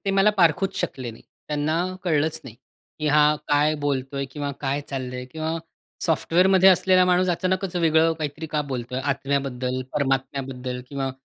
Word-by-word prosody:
ते 195 - +1
मला 195 +2 +4
पारखूच 180 +3 +3
शकले 130 -3 -3
नाही. 115 - -14 0.3
त्यांना 150 +1 0 0.3
कळलंच 160 -1 +1
नाही, 120 -5 -10 0.4
की 155 - -2
हा 150 0 +5
काय 150 +1 +3
बोलतोय 140 0 -1
किंवा 145 +1 -4
काय 140 +1 -1
चाललंय 125 -2 -4
किंवा 160 0 -3 0.5
सॉफ्टवेअरमध्ये 185 +3 +4
असलेला 185 0 +5
माणूस 180 0 +3
अचानकच 185 +1 -1
वेगळं 165 -1 +3
काहीतरी 155 +1 -4
का 150 - +2
बोलतोय? 125 0 -3
आत्म्याबद्दल, 135 -2 -1
परमात्म्याबद्दल 135 -2 -2
किंवा 135 -1 -3
145 Hz, 145 wpm, -24 LUFS, 135-165 Hz, 0.5 s, हा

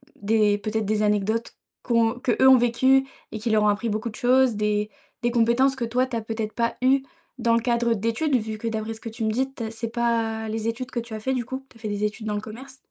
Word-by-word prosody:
des 210 0 +2
peut-être 215 +1 -2
des 210 +1 0
anecdotes 210 +2 0 0.3
qu'on 230 0 +1
qu'eux 250 +1 +3
ont 260 -1 +9
vécues 260 +3 +3 0.3
et 215 - -5
qui 225 +2 -2
leur 215 -1 +3
ont - - +4
appris 210 +3 0
beaucoup 220 +2 -2
de 220 - -11
choses, 250 0 +3
des 210 0 0 0.3
des 240 - +2
compétences 240 +3 +3
que 245 -3 -2
toi, 245 +3 +1
tu 255 -2 -6
as 230 - -1
peut-être 220 -1 -4
pas 235 0 0
eues 265 +1 +4 0.4
dans 230 -1 +3
le 230 - +2
cadre 235 0 +1
d'études 230 +8 0
vu 220 -2 -2
que, 230 - -4
d'après 220 0 -3
ce 220 - -12
que 230 - -6
tu 225 0 -6
me 220 - +1
dis, 260 +4 -1
tu 240 - -6
es 220 - -4
c'est 225 +1 -4
pas 230 -2 -1
les 220 0 -3
études 250 +3 -3
que 240 - -2
tu 230 -1 -8
as - - -5
fait 265 +5 -1
du 250 -2 -2
coup. 260 +2 -6
Tu - - -19
as - - -21
fait 220 - -4
des 205 0 -2
études 210 +1 -2
dans 210 - -1
le 205 - -2
commerce? 260 +5 -10
230 Hz, 270 wpm, -24 LUFS, 215-245 Hz, 0.4 s, ont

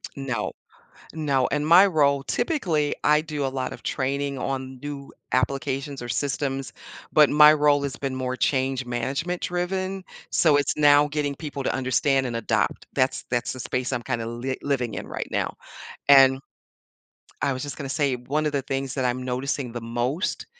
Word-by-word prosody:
No. 130 -6 -3 0.6
No, 140 -5 +1
in 150 +1 -1
my 175 +5 +8
role, 140 -5 +2
typically, 180 - 0
I 150 0 +5
do 150 -3 -3
a - - +1
lot 130 -1 -3
of 120 - -12
training 140 +1 -2
on 130 -1 -4
new 145 -1 -7 0.2
applications 135 +1 -1
or 120 - -6
systems, 135 +1 -2 0.4
but 150 -2 +6
my 150 +1 +8
role 145 -1 +3
has 140 -1 -4
been 135 -2 -3
more 130 0 -3
change-management 130 +5 -1
driven, 185 +2 -2 0.2
so 155 -4 +4
it's 145 +1 +1
now 145 0 +5
getting 145 -2 -2
people 140 -2 -6
to - - 0
understand 130 +1 +1
and 120 -2 -2
adopt, 115 - -1
that's 130 0 0
that's 120 -1 -1
the 130 - -8
space 125 +2 -2
I'm 120 -2 -2
kind 115 - -2
of 115 - -4
li 125 +3 -3
living 125 -5 -1
in - - -5
right - - -5
now. - - -2 0.5
And 135 -1 +7 1.0
I 140 0 +1
was 130 +1 -3
just 145 -2 -5
gonna 135 -1 -5
say, 140 -2 +1
one 140 +5 -2
of 150 - -1
the 140 - 0
things 135 0 -3
that 130 - -2
I'm 125 +1 -1
noticing 125 0 -3
the 120 - -5
most 120 - -2
135 Hz, 180 wpm, -24 LUFS, 130-145 Hz, 1.0 s, my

